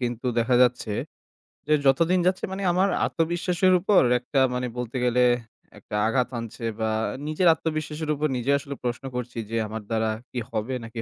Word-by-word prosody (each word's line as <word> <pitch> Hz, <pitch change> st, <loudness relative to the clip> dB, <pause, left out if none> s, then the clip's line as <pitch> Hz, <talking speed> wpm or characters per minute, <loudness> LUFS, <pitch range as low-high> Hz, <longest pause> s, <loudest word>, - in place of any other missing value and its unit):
কিন্তু 120 Hz, 0 st, -3 dB
দেখা 120 Hz, +2 st, +2 dB
যাচ্ছে, 125 Hz, -3 st, +1 dB, 0.8 s
যে 155 Hz, -, +3 dB
যত 135 Hz, +4 st, +5 dB
দিন 185 Hz, -, +4 dB
যাচ্ছে 185 Hz, +1 st, 0 dB
মানে 195 Hz, +1 st, -4 dB
আমার 190 Hz, +3 st, +2 dB, 0.2 s
আত্মবিশ্বাসের 175 Hz, +2 st, +1 dB
উপর 195 Hz, +2 st, +4 dB, 0.2 s
একটা 135 Hz, +2 st, -1 dB
মানে 125 Hz, 0 st, -1 dB
বলতে 125 Hz, +1 st, -4 dB
গেলে 125 Hz, +1 st, +3 dB, 0.6 s
একটা -, -, -7 dB
আঘাত 125 Hz, +1 st, +1 dB
হানছে। 115 Hz, 0 st, -6 dB, 0.2 s
বা 110 Hz, 0 st, 0 dB, 0.4 s
নিজের 155 Hz, +4 st, +1 dB
আত্মবিশ্বাসের 155 Hz, -1 st, -4 dB
উপর 150 Hz, +2 st, 0 dB
নিজে 125 Hz, +3 st, 0 dB
আসলে 140 Hz, 0 st, -7 dB
প্রশ্ন 120 Hz, +1 st, -3 dB
করছি, 125 Hz, 0 st, -5 dB
যে 115 Hz, -, -2 dB
আমার 110 Hz, +1 st, -5 dB
দ্বারা 110 Hz, -1 st, 0 dB, 0.2 s
কি 125 Hz, -, -3 dB
হবে 110 Hz, +3 st, -2 dB
নাকি 115 Hz, 0 st, -6 dB
125 Hz, 175 wpm, -25 LUFS, 120-160 Hz, 0.8 s, যত